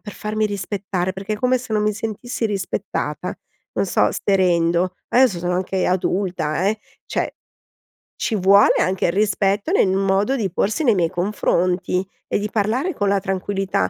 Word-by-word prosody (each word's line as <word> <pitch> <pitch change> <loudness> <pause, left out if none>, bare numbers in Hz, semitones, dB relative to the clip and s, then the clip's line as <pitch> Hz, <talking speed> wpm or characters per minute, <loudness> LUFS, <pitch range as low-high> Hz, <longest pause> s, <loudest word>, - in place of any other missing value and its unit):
per 205 - -8
farmi 215 +1 -2
rispettare, 195 -2 -3
perché 195 +2 -4
è - - -5
come 255 +2 +2
se 245 -3 -8
non 210 - +2
mi 210 0 +2
sentissi 225 +3 -4
rispettata, 195 -3 -3 0.4
non - - 0
so - - +2
se 195 -1 +1
rendo. 175 0 +2
Adesso 245 -7 +4
sono 180 +1 -1
anche 185 +1 -1
adulta, 180 -2 0
eh! 220 +1 -1 0.3
Cioè, - - -2 0.8
ci 225 - -1
vuole 200 +1 +5
anche 185 0 +1
il 170 - +2
rispetto 205 - +1
nel 385 - +4
modo 195 +6 +1
di 205 -7 -1
porsi 210 - 0
nei 235 -6 +4
miei 170 -3 +2
confronti 180 0 0 0.2
e - - 0
di 210 +1 -3
parlare 230 - 0
con 205 - 0
la 200 0 +2
tranquillità, 195 - -1
195 Hz, 170 wpm, -21 LUFS, 185-215 Hz, 0.8 s, vuole